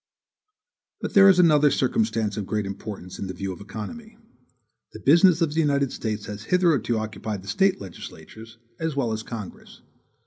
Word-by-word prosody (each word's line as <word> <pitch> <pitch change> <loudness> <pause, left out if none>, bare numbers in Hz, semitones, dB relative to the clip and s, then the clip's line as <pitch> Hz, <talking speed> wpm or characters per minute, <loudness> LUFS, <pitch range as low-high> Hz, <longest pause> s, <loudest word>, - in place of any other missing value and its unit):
But - - -5
there 195 -1 +8
is 190 - +5
another 150 -4 +5
circumstance 130 - 0
of 105 -3 -4
great 105 -2 -1
importance 100 -2 -7
in 100 - -4
the 95 - -6
view 95 +1 -4
of 90 - -12
economy. 165 - -8 0.8
The 110 - -9
business 170 - +5
of 150 -3 -1
the 160 - -1
United 140 -3 +1
States 110 -2 -4
has 105 +1 -8
hitherto 150 - +2
occupied 110 -2 -5
the - - -14
State 190 - +2
legislatures, 105 +4 -11 0.2
as 160 -3 -2
well 125 -5 0
as 110 0 -3
Congress. 110 -4 -9
115 Hz, 170 wpm, -24 LUFS, 105-160 Hz, 0.8 s, there